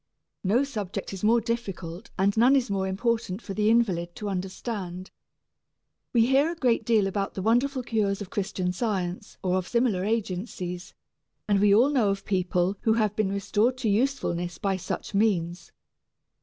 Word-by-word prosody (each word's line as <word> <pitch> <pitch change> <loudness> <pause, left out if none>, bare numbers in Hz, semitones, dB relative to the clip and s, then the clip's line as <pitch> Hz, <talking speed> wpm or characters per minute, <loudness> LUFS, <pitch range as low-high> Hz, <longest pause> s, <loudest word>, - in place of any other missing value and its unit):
No 215 +8 +3
subject 210 -9 -5
is 190 - -7
more 230 +3 +5
difficult 205 -5 -4
and 195 +1 +2
none 245 +5 +5
is 250 -6 +1
more 190 -1 0
important 215 -1 -1
for 200 - -7
the 210 +1 +2
invalid 185 -7 +1
to 210 - -4
understand. 185 -1 -5 1.0
We 230 -2 +4
hear 275 +6 +3
a - - -5
great 245 -7 +1
deal 220 -3 +3
about 195 0 -2
the 190 - -3
wonderful 255 +4 +2
cures 210 -4 0
of 205 -3 -7
Christian 190 -3 -2
Science 190 -1 -3
or 185 0 +1
of 180 - -6
similar 235 -6 +1
agencies, 190 -3 -3 0.5
and 205 -1 +3
we 205 -1 +5
all 250 +7 +5
know 240 -8 +3
of 195 0 -2
people 185 0 0
who 220 - +3
have 215 -2 +1
been 205 -3 0
restored 210 +5 +1
to 245 -4 -1
usefulness 200 -7 0
by 195 -1 0
such 185 - -5
means. 185 -5 0
205 Hz, 170 wpm, -26 LUFS, 185-230 Hz, 1.0 s, more